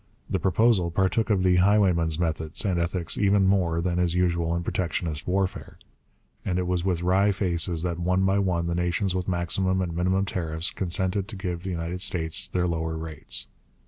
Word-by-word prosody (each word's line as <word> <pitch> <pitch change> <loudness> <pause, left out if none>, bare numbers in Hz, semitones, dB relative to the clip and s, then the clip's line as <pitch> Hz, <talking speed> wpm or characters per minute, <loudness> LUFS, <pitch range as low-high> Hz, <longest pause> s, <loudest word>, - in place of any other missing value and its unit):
The 95 - +1
proposal 95 0 +2
partook 95 +6 0
of 100 -3 +2
the 90 -1 +4
highwayman's 90 -5 +3
methods 80 +2 -1
and 90 -3 +1
ethics 85 0 -1
even 100 -1 +3
more 90 -4 +2
than 90 0 -1
is 90 -1 +1
usual 85 -2 +1
in 85 - -2
protectionist 85 -3 -3
warfare; 95 +1 -2 0.7
and 90 -2 -1
it 90 - 0
was 90 -1 -1
with 90 -2 -1
wry 95 +3 +3
faces 85 -3 -1
that 85 -1 -2
one 90 +2 +1
by 95 +1 +2
one 90 -4 0
the 85 - -1
nations 90 +2 0
with 90 -1 -2
maximum 95 +1 0
and 85 -3 -2
minimum 95 +3 +1
tariffs 80 -3 -3
consented 95 +2 0
to 115 - -8
give 90 -3 -4
the 95 - -5
United 85 +1 -4
States 85 +2 +1
their 90 -1 -1
lower 80 -2 -2
rates. 80 -2 -3
90 Hz, 185 wpm, -25 LUFS, 85-95 Hz, 0.7 s, the